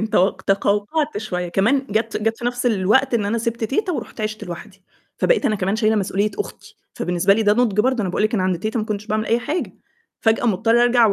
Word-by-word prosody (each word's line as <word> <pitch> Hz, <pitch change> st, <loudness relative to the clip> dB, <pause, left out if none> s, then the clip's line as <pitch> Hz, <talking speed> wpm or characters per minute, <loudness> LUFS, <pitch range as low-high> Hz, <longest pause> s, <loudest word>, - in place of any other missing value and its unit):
ممكن 220 Hz, +1 st, -2 dB
تو 190 Hz, -3 st, +4 dB
تقَوقَعت 205 Hz, +9 st, 0 dB
شوية. 180 Hz, -5 st, -3 dB
كمان 240 Hz, +10 st, +1 dB
جَات 225 Hz, +2 st, 0 dB
جَات 225 Hz, +1 st, -1 dB
في 240 Hz, -, -8 dB
نَفْس 245 Hz, +1 st, -1 dB
الوقت 235 Hz, +5 st, +2 dB
إن 215 Hz, -, +1 dB
أنا 230 Hz, +3 st, 0 dB
سِبت 230 Hz, 0 st, -2 dB
تيتة 360 Hz, -, -1 dB
ورُحت -, -, -6 dB
عِشت 215 Hz, 0 st, -3 dB
لوحدي، 190 Hz, +3 st, -9 dB, 0.4 s
فبقيت -, -, +2 dB
أنا 215 Hz, -, +1 dB
كمان 195 Hz, +2 st, -1 dB
شايلة 220 Hz, -1 st, +2 dB
مسؤولية 200 Hz, +1 st, 0 dB
أختي، 415 Hz, -, -7 dB, 0.2 s
فبالنسبة 180 Hz, +2 st, +2 dB
لي 220 Hz, -, +1 dB
ده 205 Hz, -, +4 dB
نُضْج 215 Hz, -3 st, +2 dB
برضه، 255 Hz, +1 st, +1 dB
أنا 190 Hz, -, -1 dB
باقول 180 Hz, -, -1 dB
لِك 215 Hz, +2 st, +1 dB
أنا 190 Hz, -, +1 dB
عند 185 Hz, -2 st, 0 dB
تيتة 215 Hz, +6 st, -2 dB
ما -, -, -2 dB
كنتش 210 Hz, -1 st, -4 dB
باعمل 215 Hz, 0 st, -1 dB
أي 230 Hz, -, +2 dB
حاجة، 300 Hz, +8 st, -3 dB, 0.5 s
فجأة 225 Hz, +1 st, +2 dB
مضطرة 225 Hz, +3 st, +3 dB
أرجع 240 Hz, -1 st, +5 dB
و 205 Hz, -, +3 dB
215 Hz, 230 wpm, -21 LUFS, 200-240 Hz, 0.5 s, أرجع